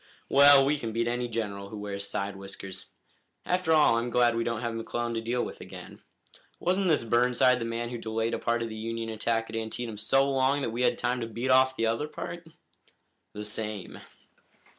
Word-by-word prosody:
"Well, 140 Hz, 0 st, +8 dB
we 145 Hz, +1 st, +1 dB
can 115 Hz, -3 st, -4 dB
beat 115 Hz, +1 st, 0 dB
any 120 Hz, +1 st, -1 dB
general 100 Hz, -4 st, -4 dB
who 110 Hz, -, -8 dB
wears 100 Hz, -1 st, -4 dB
side 100 Hz, +1 st, -3 dB
whiskers. 95 Hz, -1 st, -8 dB, 0.6 s
After 180 Hz, -2 st, 0 dB
all, 150 Hz, -7 st, +5 dB
I'm 120 Hz, +1 st, -3 dB
glad 120 Hz, -1 st, +3 dB
we 115 Hz, -, 0 dB
don't 115 Hz, -1 st, -2 dB
have 120 Hz, -1 st, -2 dB
McClellan 120 Hz, +1 st, -3 dB
to 115 Hz, -, -2 dB
deal 120 Hz, +2 st, -1 dB
with -, -, -9 dB
again. -, -, -10 dB, 0.6 s
Wasn't 185 Hz, +2 st, +1 dB
this 155 Hz, -7 st, +3 dB
Burnside 125 Hz, +2 st, +3 dB
the 115 Hz, -, -3 dB
man 115 Hz, +1 st, -3 dB
who 120 Hz, -1 st, -5 dB
delayed 115 Hz, +1 st, -2 dB
a -, -, -1 dB
part 115 Hz, 0 st, 0 dB
of 115 Hz, -, -4 dB
the 110 Hz, -, -7 dB
Union 115 Hz, +1 st, -4 dB
attack 115 Hz, +1 st, -1 dB
at -, -, -6 dB
Antietam 110 Hz, 0 st, -4 dB
so 135 Hz, +5 st, +3 dB
long 135 Hz, +1 st, +1 dB
that 115 Hz, -, -1 dB
we 120 Hz, +2 st, -3 dB
had -, -, +2 dB
time 125 Hz, 0 st, -1 dB
to 115 Hz, -, -3 dB
beat 120 Hz, +4 st, -2 dB
off 130 Hz, 0 st, +5 dB
the 115 Hz, -, 0 dB
other 115 Hz, +7 st, 0 dB
part?" 170 Hz, +2 st, -7 dB, 0.9 s
"The 105 Hz, 0 st, -6 dB
same." 105 Hz, -2 st, -3 dB
115 Hz, 205 wpm, -28 LUFS, 110-125 Hz, 0.9 s, Well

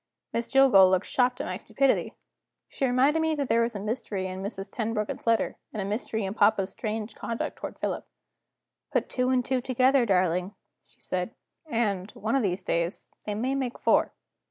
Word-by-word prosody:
Miss 230 Hz, 0 st, -1 dB
Jillgall 260 Hz, -9 st, +6 dB
looked 185 Hz, +1 st, +2 dB
shocked 250 Hz, +1 st, +1 dB
at -, -, -4 dB
my 185 Hz, -, -3 dB
stupidity. 255 Hz, +6 st, 0 dB, 0.5 s
She 270 Hz, -, -1 dB
reminded 265 Hz, +5 st, +3 dB
me 320 Hz, -1 st, +1 dB
that 280 Hz, -3 st, -2 dB
there 230 Hz, +1 st, +4 dB
was 230 Hz, -1 st, 0 dB
a -, -, -3 dB
mystery 210 Hz, -2 st, -3 dB
in 185 Hz, 0 st, -5 dB
Mrs. 195 Hz, 0 st, -5 dB
Tenbruggen's 220 Hz, -1 st, -3 dB
letter 230 Hz, -1 st, +2 dB
and 215 Hz, -, -5 dB
a 195 Hz, -, -1 dB
mystery 215 Hz, +1 st, -2 dB
in 190 Hz, -, -3 dB
papa's 205 Hz, -2 st, +3 dB
strange 215 Hz, -1 st, -4 dB
conduct 230 Hz, +1 st, -4 dB
toward -, -, -7 dB
Philip. -, -, -3 dB, 0.8 s
"Put -, -, 0 dB
two 250 Hz, 0 st, 0 dB
and 255 Hz, -2 st, +2 dB
two 260 Hz, -2 st, 0 dB
together, 255 Hz, 0 st, +3 dB
darling," 180 Hz, 0 st, +1 dB, 0.3 s
she -, -, -26 dB
said; 185 Hz, +5 st, -3 dB, 0.3 s
"and, 210 Hz, -7 st, -1 dB
one 220 Hz, +5 st, -1 dB
of 270 Hz, -, +3 dB
these 190 Hz, -3 st, -1 dB
days, 170 Hz, +1 st, -1 dB, 0.2 s
they 210 Hz, -, -1 dB
may 250 Hz, +5 st, -1 dB
make 260 Hz, -3 st, -2 dB
four." -, -, +3 dB
225 Hz, 185 wpm, -27 LUFS, 195-255 Hz, 0.8 s, Jillgall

